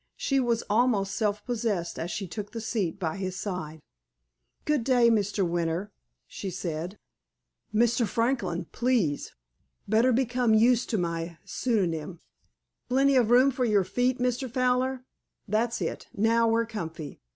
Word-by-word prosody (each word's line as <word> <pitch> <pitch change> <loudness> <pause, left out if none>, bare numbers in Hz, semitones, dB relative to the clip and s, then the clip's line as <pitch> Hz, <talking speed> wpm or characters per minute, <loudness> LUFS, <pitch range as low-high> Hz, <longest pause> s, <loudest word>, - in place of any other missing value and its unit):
She 275 -1 +1
was 240 -2 +1
almost 210 -3 +2
self 210 -1 -1
possessed 215 -8 -2
as 165 - -3
she 195 0 -4
took 205 +4 -7
the 230 - -4
seat 215 -6 -2
by 170 0 -2
his 185 -1 -3
side. 160 -6 -5 0.8
"Good 300 -5 +1
day, 245 -2 +4
Mr. 205 -3 +1
Winter," 170 +3 -2 0.3
she 195 - -6
said. 175 +1 -4 0.7
"Mr. 235 +1 +2
Franklin, 230 -8 -1
please. 235 - 0 0.5
Better 225 +5 +4
become 245 -2 +2
used 240 +2 +4
to 220 - 0
my 170 -1 -3
pseudonym.... 175 -8 -1 0.7
Plenty 270 +2 +3
of 240 -4 +4
room 255 +3 +6
for 255 0 -2
your 210 -5 +3
feet, 250 +6 0
Mr. 250 +1 -1
Fowler? 255 +1 0 0.4
That's 225 +3 0
it. - - -3
Now 230 +2 +3
we're 230 +1 +2
comfy. 165 -9 -6
220 Hz, 140 wpm, -27 LUFS, 185-245 Hz, 0.8 s, room